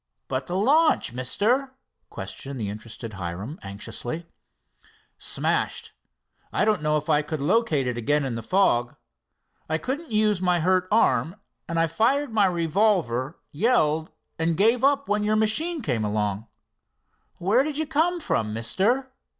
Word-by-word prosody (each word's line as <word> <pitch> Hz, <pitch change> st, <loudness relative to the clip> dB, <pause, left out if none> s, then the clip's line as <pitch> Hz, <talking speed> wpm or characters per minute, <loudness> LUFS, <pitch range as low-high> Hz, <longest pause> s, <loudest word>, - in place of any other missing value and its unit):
"But 130 Hz, 0 st, -3 dB
the 175 Hz, -, -3 dB
launch, 280 Hz, -, +3 dB
Mister?" 240 Hz, -, +1 dB, 0.3 s
questioned 135 Hz, -1 st, -7 dB
the 105 Hz, -3 st, -2 dB
interested 110 Hz, +2 st, -7 dB
Hiram 95 Hz, -, -6 dB
anxiously. 115 Hz, -, -6 dB, 0.9 s
"Smashed. -, -, -1 dB, 0.6 s
I 205 Hz, -, +1 dB
don't 215 Hz, -6 st, +2 dB
know 150 Hz, 0 st, +2 dB
if 150 Hz, -, -5 dB
I 150 Hz, -, +3 dB
could 155 Hz, +1 st, -4 dB
locate 160 Hz, -, +2 dB
it 125 Hz, -1 st, -2 dB
again 145 Hz, +4 st, +1 dB
in 130 Hz, -, -2 dB
the 115 Hz, -, -4 dB
fog. 120 Hz, -, +2 dB, 0.7 s
I 160 Hz, -, +1 dB
couldn't 285 Hz, -, -4 dB
use 210 Hz, -3 st, +2 dB
my 180 Hz, -1 st, +2 dB
hurt 185 Hz, +2 st, +2 dB
arm, 165 Hz, -, +2 dB, 0.3 s
and 165 Hz, 0 st, 0 dB
I 165 Hz, -, +4 dB
fired 230 Hz, -, +1 dB
my 205 Hz, -3 st, +4 dB
revolver, 170 Hz, -, +1 dB
yelled, 160 Hz, -, +2 dB, 0.3 s
and 165 Hz, 0 st, +1 dB
gave 230 Hz, +5 st, +4 dB
up 280 Hz, 0 st, +3 dB
when 210 Hz, 0 st, +1 dB
your 215 Hz, +1 st, +2 dB
machine 275 Hz, +9 st, +1 dB
came 115 Hz, -, 0 dB
along." 105 Hz, 0 st, -1 dB, 0.9 s
"Where 200 Hz, +8 st, +3 dB
did 295 Hz, -1 st, -4 dB
you 315 Hz, -, 0 dB
come 320 Hz, +4 st, +1 dB
from, 110 Hz, -, -1 dB
Mister?" 220 Hz, -, 0 dB
170 Hz, 150 wpm, -25 LUFS, -, 0.9 s, I